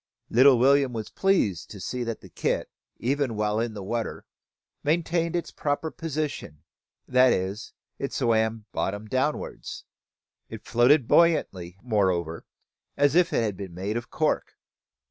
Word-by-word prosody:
Little 130 +2 +7
William 135 +1 +4
was 110 -2 -5
pleased 105 - +1
to 100 - -9
see 125 +7 -3
that 115 -1 -4
the - - -13
kit, - - -2 0.3
even 135 -1 -1
while 105 0 0
in 115 -1 -2
the 100 - -6
water, 115 +4 -3 0.6
maintained 165 +2 0
its 175 - -2
proper 145 +2 -2
position, 150 - -4 0.4
that 125 0 +5
is, 95 +4 -2 0.3
it 140 - -3
swam 110 -3 0
bottom 105 +2 -2
downwards. 130 +7 -3 0.6
It - - -9
floated 120 +3 +4
buoyantly, 95 - +2
moreover, 95 -8 0 0.5
as 145 0 +3
if 175 0 +4
it - - +1
had 105 -3 -1
been 95 -3 -8
made 100 +4 -3
of 120 0 -4
cork. - - -1
120 Hz, 145 wpm, -26 LUFS, 105-145 Hz, 0.6 s, Little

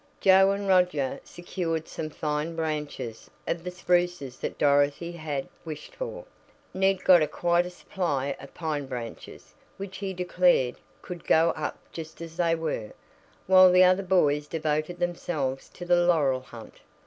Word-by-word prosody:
Joe 190 0 +6
and 200 0 -1
Roger 180 -8 +2
secured 170 -2 -4
some 155 - -5
fine 150 +2 -3
branches 150 -7 -4 0.2
of 170 0 -2
the 180 - -4
spruces 175 -6 -1
that - - -4
Dorothy 145 +3 +2
had 155 -5 -4 0.2
wished 155 - -8
for, - - -6 0.5
Ned 190 0 +1
got 170 -5 +6
quite 175 +2 +1
a - - -6
supply 145 -7 -2
of 135 - -11
pine 150 -4 -3
branches, 120 -3 -8 0.2
which 195 -1 -7
he 195 -1 -4
declared, 180 -7 +2 0.3
"could 180 -2 -8
go 165 +1 +4
up - - -4
just 160 -1 -8
as 165 0 -9
they 170 -2 +2
were," 155 -10 -4 0.5
while 185 -1 +7
the 180 +1 +7
other 185 +1 +4
boys 150 -6 +2
devoted 155 +2 -2
themselves 165 -6 -2
to 175 - -9
the 175 0 +4
laurel 145 -7 +3
hunt. 115 -3 -13
165 Hz, 150 wpm, -27 LUFS, 150-180 Hz, 0.5 s, while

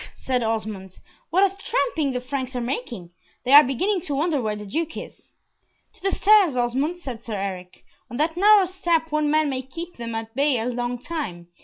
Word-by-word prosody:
said 255 -1 -1
Osmond, 215 -4 -3 0.3
"what 370 +5 +3
a - - -15
tramping 325 - 0
the 250 - -2
Franks 260 0 -4
are - - -1
making. 235 -7 -4 0.3
They 255 - 0
are 295 +1 +11
beginning 360 - 0
to 285 - -1
wonder 300 -1 +1
where 215 -2 -2
the 210 0 -8
Duke 320 +10 -3
is." - - -10 0.6
"To - - -21
the 390 +1 0
stairs, 400 -8 +5
Osmond," 260 +8 0
said 250 -8 -7
Sir 220 - -5
Eric. 185 -2 -6 0.3
"On 240 - -6
that 320 +3 0
narrow 405 +1 +6
step 340 -3 0
one 305 -1 +1
man 310 0 +3
may 260 -2 -2
keep 330 +7 -8
them 230 -1 -5
at 225 0 -5
bay 280 0 +2
a 225 - -2
long 245 0 -2
time. 235 - -6
265 Hz, 200 wpm, -23 LUFS, 230-325 Hz, 0.6 s, are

